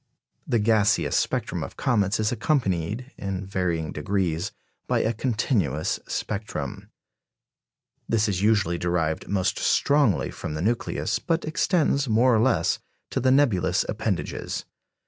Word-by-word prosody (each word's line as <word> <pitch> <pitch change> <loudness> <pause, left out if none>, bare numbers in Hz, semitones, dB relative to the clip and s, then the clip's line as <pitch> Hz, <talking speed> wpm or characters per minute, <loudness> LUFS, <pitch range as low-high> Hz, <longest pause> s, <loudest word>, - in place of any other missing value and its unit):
The 125 -5 +2
gaseous 105 -1 +2
spectrum - - 0
of - - -7
comets 105 -5 +1
is 110 0 +1
accompanied, 115 - -1
in 95 -1 -3
varying 90 -4 -1
degrees, 95 -1 -1 0.4
by - - +2
a 110 - +1
continuous 105 - 0
spectrum. 105 +1 -4 1.2
This 110 -1 +2
is 95 -3 -1
usually 100 -5 +2
derived 85 -2 -1
most 100 0 0
strongly 140 - +2
from 75 - -5
the 75 - -3
nucleus, 115 +3 0
but 165 0 -1
extends, 155 -3 +1
more 120 +3 +4
or - - +3
less, 130 0 +2 0.3
to - - 0
the 130 - +2
nebulous 130 -9 +3
appendages. - - -3
105 Hz, 125 wpm, -25 LUFS, 90-120 Hz, 1.2 s, more